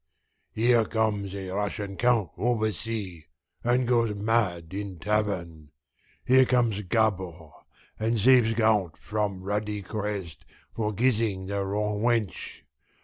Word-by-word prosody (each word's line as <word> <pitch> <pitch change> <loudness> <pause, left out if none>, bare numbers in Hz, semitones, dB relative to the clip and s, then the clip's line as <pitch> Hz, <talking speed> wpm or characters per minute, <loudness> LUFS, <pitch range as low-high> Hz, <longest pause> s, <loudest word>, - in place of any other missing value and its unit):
Here 115 +1 +3
comes 105 -3 -1
a 95 -1 -5
Russian 100 0 -3
count 115 -7 +2
oversea, 110 -6 -2 0.4
and 120 +1 +2
goes 115 -3 +2
mad 100 -6 0
in 100 -2 -5
tavern. 85 -6 -2 0.6
Here 130 +1 +6
comes 120 -5 +1
Gabord, 95 -6 -1 0.5
and 110 +1 0
saves 120 0 +5
count 105 -7 +2
from 105 -3 -3
ruddy 105 +1 -2
crest 100 -6 -5 0.3
for 105 -2 -1
kissing 110 -3 0
the 100 +1 -2
wrong 105 +1 -1
wench. 115 -6 -1
105 Hz, 115 wpm, -27 LUFS, 95-115 Hz, 0.6 s, Here